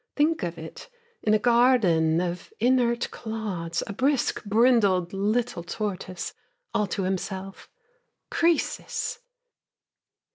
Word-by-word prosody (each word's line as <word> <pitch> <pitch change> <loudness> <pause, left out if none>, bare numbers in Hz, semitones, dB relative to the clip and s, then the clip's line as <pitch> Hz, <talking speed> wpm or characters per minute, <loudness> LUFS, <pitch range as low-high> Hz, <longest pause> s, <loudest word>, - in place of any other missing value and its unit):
Think 310 +2 +2
of 170 -1 -3
it, 160 - -9 0.3
in 215 0 +3
a - - +5
garden 210 -9 +4
of 175 -1 -4
inert 240 0 +2
clods 205 -7 -4
A - - -6
brisk, 270 +4 +1
brindled 205 -5 +3
little 215 +1 0
tortoise, 185 -1 -4 0.4
all 210 - +1
to 195 - -2
himself 190 +1 -4 0.6
Croesus! 335 +6 0
210 Hz, 105 wpm, -26 LUFS, 180-245 Hz, 0.6 s, a